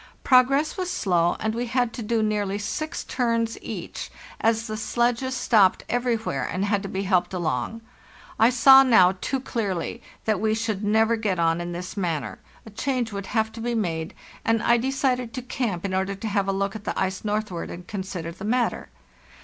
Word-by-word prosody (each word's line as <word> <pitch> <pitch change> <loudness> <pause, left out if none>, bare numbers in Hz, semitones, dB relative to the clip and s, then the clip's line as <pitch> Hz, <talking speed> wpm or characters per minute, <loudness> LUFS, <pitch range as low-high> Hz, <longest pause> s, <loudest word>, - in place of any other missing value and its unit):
Progress 275 +5 +4
was 365 -1 -2
slow, 175 - +1
and 220 0 -1
we 240 +2 -2
had 245 -1 0
to - - -6
do 225 0 0
nearly 205 -2 0
six 260 +10 -4
turns 230 -2 0
each, - - -6 0.3
as 225 0 +1
the 215 - -4
sledges 240 +4 0
stopped 210 -6 +3
everywhere 230 - -1
and 190 +2 -2
had 205 -1 +1
to 195 - -6
be 190 +1 -2
helped 185 -1 +1
along. 175 - -2 0.6
I 225 - +6
saw 260 +2 +8
now 195 -8 +5
too 270 - -1
clearly 225 -3 -3 0.2
that 215 -3 +1
we 220 0 +1
should 220 -2 -2
never 220 +2 +3
get 205 -4 -1
on 165 0 +2
in 175 0 -4
this 180 +1 -6
manner; 170 -7 -2 0.3
a 220 - -11
change 245 +1 -1
would 200 -1 -5
have 220 +1 0
to 225 - -8
be 240 +1 -1
made, 165 -6 -2 0.3
and 225 -1 +1
I 235 0 +4
decided 255 -2 -1
to 255 - -4
camp 225 -8 -3
in 190 - -2
order 190 +1 0
to 210 +3 -5
have 200 -2 0
a - - +2
look 195 +1 -1
at 215 - -7
the - - -3
ice 190 0 -1
northward 210 -4 -2
and 175 +1 -8
consider 185 -4 -5
the 185 +3 -11
matter. 235 - 0
215 Hz, 195 wpm, -25 LUFS, 190-235 Hz, 0.6 s, saw